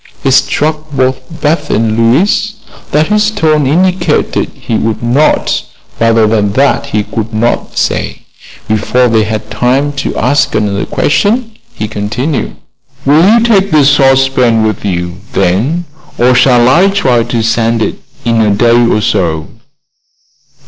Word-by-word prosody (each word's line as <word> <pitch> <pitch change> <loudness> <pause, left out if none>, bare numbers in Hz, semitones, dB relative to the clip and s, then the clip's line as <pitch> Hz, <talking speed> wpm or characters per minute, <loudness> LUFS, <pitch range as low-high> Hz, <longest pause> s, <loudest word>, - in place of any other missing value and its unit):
It 135 - +1
struck 150 +3 0
both 130 -1 0 0.2
Beth 155 +2 0
and 110 -1 0
Louise 160 - +1 0.4
that 155 +4 +1
his 210 0 +2
tone 155 -9 +1
indicated 180 +5 0
he 115 - -4
would 110 +1 -2
not, 130 +6 +1 0.4
rather 115 -1 +3
than 105 -2 0
that 140 +4 +1
he 105 -1 -1
could 110 +1 -5
not 120 +2 -1
say. - - -2 0.4
Before 110 +4 +1
they 110 -2 +2
had 110 0 -5
time 130 +6 0
to - - -4
ask 145 +5 +1
another 100 -2 -1
questioned 225 - 0 0.2
he 110 - -4
continued: 115 +8 -3 0.5
"Will 150 +4 +4
you 230 +1 +4
take 205 -4 +2
the 150 -3 +3
saucepan 135 -4 +3
with 110 - -3
you, 90 -3 -3 0.2
then, 110 - 0 0.3
or 125 +1 +3
shall 125 -1 +4
I 170 +9 +4
try 130 -12 +1
to 115 -1 -2
send 115 0 0
it - - -4 0.3
in 115 -1 +1
a 110 - +2
day 120 +3 +3
or 110 - +1
so?" 85 -8 -1
125 Hz, 145 wpm, -11 LUFS, 110-150 Hz, 0.5 s, Will